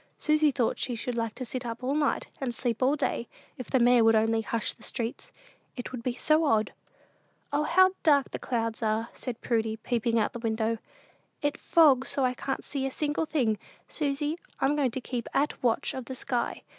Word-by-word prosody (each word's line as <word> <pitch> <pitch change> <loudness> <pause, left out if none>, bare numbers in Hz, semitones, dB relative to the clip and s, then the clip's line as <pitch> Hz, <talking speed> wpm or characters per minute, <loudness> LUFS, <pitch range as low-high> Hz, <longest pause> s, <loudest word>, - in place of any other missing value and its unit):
Susy 305 -1 +3
thought 255 -4 0
she 245 - -1
should 245 +2 -3
like 230 -2 -2
to 255 - -5
sit 250 +2 -4
up 235 +1 -6
all 265 +2 0
night, 295 -1 +1
and 245 -3 -2
sleep 240 -1 -2
all 265 +3 +4
day, 260 -5 -1 0.3
if 255 - -6
the 265 - +3
mayor 245 -1 +5
would 225 0 +5
only 225 +1 +3
hush 230 0 -1
the - - -24
streets; 235 -1 -4 0.4
it 245 - -6
would 250 -2 -5
be 240 0 -2
so 310 +4 +3
odd! 220 -6 +2 0.8
"O, 290 - +2
how 375 +3 +5
dark 285 -4 +4
the - - -4
clouds 230 -2 -2
are!" 220 +1 0
said 245 -3 -6
Prudy, 220 -2 0
peeping 230 0 0
out 215 +1 0
of 240 - -5
the - - -5
window; 225 0 0 0.6
"it 290 0 +1
fogs 280 -6 +4
so 275 -2 +1
I 250 - +1
can't 270 +2 -3
see 270 -2 -2
a - - -2
single 295 +3 -1
thing. 230 -10 +1 0.3
Susy, 295 +2 -1 0.2
I'm 280 +2 +2
going 280 -3 +2
to 255 +2 -5
keep 245 -2 -4
at 290 +2 +1
watch 235 -3 +1
of 260 -2 -5
the 260 - -6
sky. 245 -1 -2
250 Hz, 210 wpm, -28 LUFS, 230-280 Hz, 0.8 s, mayor